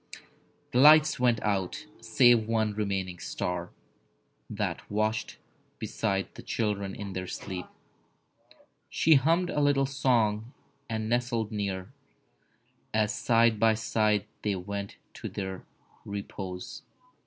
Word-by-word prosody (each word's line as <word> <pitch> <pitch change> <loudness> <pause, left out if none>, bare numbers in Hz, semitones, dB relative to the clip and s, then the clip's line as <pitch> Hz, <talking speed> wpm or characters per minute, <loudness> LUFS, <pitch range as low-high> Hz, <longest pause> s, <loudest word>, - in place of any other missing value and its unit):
The 125 - +2
lights 150 +1 +7
went 120 -3 +3
out, 100 - -1 0.2
save 115 0 +4
one 110 -2 +1
remaining 95 -4 -2
star 90 -1 -3 0.8
That - - -2
watched 110 +1 -1 0.4
beside 95 -3 -2
the - - -10
children 100 -3 -2
in 100 -2 -6
their 95 0 -4
sleep. 90 -1 -6 1.2
She 160 - +4
hummed 165 +6 +3
a - - -1
little 140 -1 +3
song 120 -4 +1 0.4
and 110 -1 -2
nestled 120 -2 0
near, 100 -3 -3 1.0
As 110 -1 +2
side 115 -1 +3
by 110 0 +4
side 105 -2 +1 0.2
they 105 -2 0
went 100 +2 -5 0.2
to - - -6
their 95 -2 -6 0.4
repose. 95 -2 -6
110 Hz, 115 wpm, -28 LUFS, 100-120 Hz, 1.2 s, lights